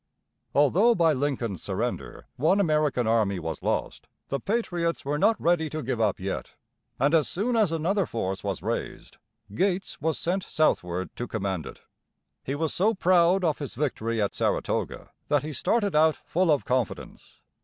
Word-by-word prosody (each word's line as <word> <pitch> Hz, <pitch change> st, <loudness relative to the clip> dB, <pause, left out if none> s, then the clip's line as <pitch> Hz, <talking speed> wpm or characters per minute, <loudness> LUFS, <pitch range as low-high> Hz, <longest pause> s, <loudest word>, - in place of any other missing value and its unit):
Although 185 Hz, -, +4 dB
by 165 Hz, -3 st, +4 dB
Lincoln's 130 Hz, -, -2 dB
surrender -, -, -4 dB
one 165 Hz, +9 st, +2 dB
American 150 Hz, -8 st, +2 dB
army 110 Hz, -3 st, +2 dB
was 80 Hz, -2 st, -5 dB
lost, -, -, -2 dB, 0.2 s
the 140 Hz, -, -1 dB
patriots 175 Hz, -, -1 dB
were 145 Hz, +1 st, -1 dB
not 225 Hz, +6 st, +3 dB
ready 165 Hz, -2 st, +2 dB
to 155 Hz, 0 st, -4 dB
give 125 Hz, -2 st, -2 dB
up 105 Hz, -3 st, +1 dB
yet, 95 Hz, +1 st, -5 dB, 0.4 s
and 140 Hz, +4 st, +2 dB
as 160 Hz, -3 st, +3 dB
soon 230 Hz, +7 st, -1 dB
as 215 Hz, -7 st, +3 dB
another 170 Hz, +4 st, 0 dB
force 95 Hz, -4 st, -3 dB
was 100 Hz, -3 st, -3 dB
raised, -, -, -4 dB, 0.4 s
Gates 190 Hz, -, -1 dB
was 160 Hz, 0 st, 0 dB
sent 185 Hz, +3 st, -1 dB
southward 90 Hz, -, 0 dB
to 120 Hz, -, -3 dB
command 95 Hz, -6 st, -3 dB
it. -, -, -11 dB, 0.6 s
He 135 Hz, -, -3 dB
was 160 Hz, +1 st, -1 dB
so 215 Hz, +5 st, +2 dB
proud 185 Hz, 0 st, +4 dB
of 160 Hz, -4 st, +1 dB
his 145 Hz, -4 st, -6 dB
victory 115 Hz, -5 st, -1 dB
at 100 Hz, -2 st, 0 dB
Saratoga -, -, -2 dB, 0.2 s
that 145 Hz, -1 st, +2 dB
he 155 Hz, 0 st, -5 dB
started 205 Hz, -, +1 dB
out 155 Hz, 0 st, +5 dB
full 180 Hz, +1 st, -1 dB
of 145 Hz, -, +1 dB
confidence. 125 Hz, -3 st, -3 dB
150 Hz, 165 wpm, -26 LUFS, 115-175 Hz, 0.6 s, out